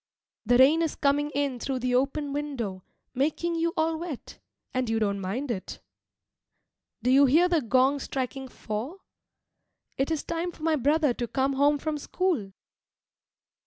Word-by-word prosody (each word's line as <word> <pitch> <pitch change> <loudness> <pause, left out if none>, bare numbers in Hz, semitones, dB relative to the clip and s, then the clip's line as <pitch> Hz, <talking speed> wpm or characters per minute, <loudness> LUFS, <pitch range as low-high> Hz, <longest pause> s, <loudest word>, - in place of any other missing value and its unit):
The 245 +1 +5
rain 285 +6 +6
is 325 -2 -1
coming 290 +1 +1
in 280 -3 -1
through 270 +2 -2
the 250 0 -1
open 275 +3 0
window, 245 -11 -4 0.3
making 310 +6 0
you 335 0 0
all 320 0 +1
wet, 330 -7 -7 0.3
and 255 -2 -1
you 225 - +1
don't 200 -2 0
mind 240 +9 -3
it. 190 -5 -5 1.2
Do 250 - +3
you 275 +1 +6
hear 325 +7 +5
the 340 -3 +2
gong 260 +3 +3
striking 265 0 -4
four? 245 - -6 1.0
It 270 - +1
is 320 -2 -1
time 335 +1 -3
for 310 - -14
my 320 -1 +3
brother 295 0 +2
to 240 0 -4
come 270 +3 0
home 285 +2 +3
from 300 +1 -3
school. 310 - -1
275 Hz, 160 wpm, -27 LUFS, 250-310 Hz, 1.2 s, rain